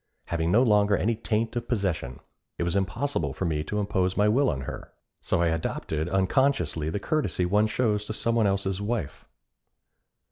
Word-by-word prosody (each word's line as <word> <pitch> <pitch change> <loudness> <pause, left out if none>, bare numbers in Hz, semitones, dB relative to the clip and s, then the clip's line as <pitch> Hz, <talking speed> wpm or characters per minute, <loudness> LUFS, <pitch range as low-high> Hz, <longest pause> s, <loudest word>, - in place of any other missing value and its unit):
Having 85 0 0
no 115 +6 +5
longer 105 -3 +4
any 115 +4 +1
taint 115 +1 -1
of 120 - -3
possession, 90 - -2 0.4
it - - -1
was 85 +2 -1
impossible 100 - -1
for 95 - -2
me 75 -3 -1
to 105 - -2
impose 95 -3 0
my 105 +1 +4
will 130 +6 +3
on 70 -4 -2
her, - - -7 0.3
so 85 - +1
I 85 - +3
adopted 80 0 -2
unconsciously 95 - +1
the 100 - -2
courtesy 100 - 0
one 105 +4 +3
shows 105 -2 0
to 110 - -4
some 115 +1 0
one 115 -3 +3
else's 95 0 -1
wife. 105 - -3
100 Hz, 180 wpm, -26 LUFS, 85-110 Hz, 0.4 s, no